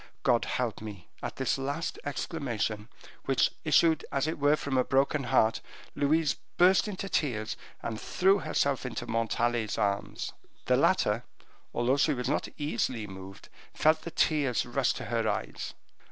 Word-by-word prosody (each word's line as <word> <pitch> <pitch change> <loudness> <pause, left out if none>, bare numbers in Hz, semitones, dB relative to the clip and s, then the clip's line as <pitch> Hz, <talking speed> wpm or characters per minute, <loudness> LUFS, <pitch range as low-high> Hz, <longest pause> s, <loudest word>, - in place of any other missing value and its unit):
God 120 -2 +3
help 120 -5 -2
me!" 105 -5 -9
At - - -4
this 135 0 0
last 140 +5 -3
exclamation, 120 - -3 0.4
which 135 -1 +3
issued 160 0 +4
as 140 0 +1
it 160 -1 -2
were 145 +1 +4
from 140 -3 -3
a 130 - +4
broken 135 +1 +1
heart, 110 -1 +3 0.3
Louise 150 0 +2 0.2
burst 185 +4 +5
into 195 -1 -4
tears, 115 - -1 0.3
and 110 -2 -4
threw 195 +2 +3
herself 140 -4 0
into 125 - -4
Montalais's 115 0 0
arms. 100 -1 -1 0.3
The - - +4
latter, - - +2 0.5
although 120 +3 +1
she 145 +1 +3
was 125 -1 -3
not 150 - 0
easily 130 -6 -1
moved, 95 -1 -10 0.3
felt 155 +1 +4
the - - -6
tears 145 -7 +1
rush 125 +1 +1
to - - -6
her 115 -2 0
eyes. 105 - -4
135 Hz, 155 wpm, -29 LUFS, 115-150 Hz, 0.5 s, burst